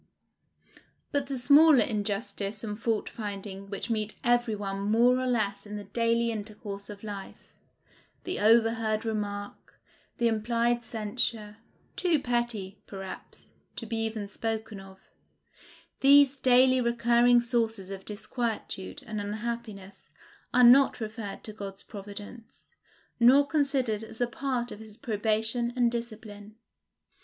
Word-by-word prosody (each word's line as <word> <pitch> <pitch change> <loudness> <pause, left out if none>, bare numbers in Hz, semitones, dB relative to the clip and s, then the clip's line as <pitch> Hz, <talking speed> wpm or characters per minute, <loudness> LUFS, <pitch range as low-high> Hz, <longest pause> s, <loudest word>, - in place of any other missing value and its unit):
But 285 -1 0
the 270 -1 -3
smaller 285 0 +6
injustice 205 0 -3
and 210 0 -5
fault 225 -2 0
finding 200 -2 -6
which 200 +3 -4
meet 215 -1 -1
every 240 -2 +2
one 195 -1 -4
more 235 +5 +3
or 255 - -1
less 210 -4 -1
in 210 - -6
the 205 - -5
daily 230 +3 0
intercourse 205 -2 -6
of 205 0 -10
life, 205 -2 -9 0.7
the 365 - -3
overheard 225 0 +3
remark, 205 -2 -5 0.4
the 235 - +2
implied 235 +2 +1
censure, 215 -1 -2 0.4
too 350 -4 +2
petty, 240 -6 -2
perhaps, 195 -1 -9 0.2
to - - -6
be 230 - -3
even 220 -2 -2
spoken 220 0 -4
of, 195 0 -13 1.0
these 280 0 +6
daily 255 0 +4
recurring 240 0 +4
sources 225 -5 -1
of 195 -1 -7
disquietude 220 +2 -4
and 215 -3 -4
unhappiness 210 -2 -6 0.4
are 250 +1 +4
not 260 +3 +7
referred 215 -2 -6
to 215 - -7
God's 200 -2 -8
providence, 205 +2 -11 0.5
nor 260 +4 +6
considered 270 -8 0
as 225 0 -11
a 245 - +3
part 245 0 -3
of - - -8
his 220 -1 -12
probation 225 0 0
and 240 -2 +3
discipline. 215 -3 -7
225 Hz, 130 wpm, -28 LUFS, 205-240 Hz, 1.0 s, not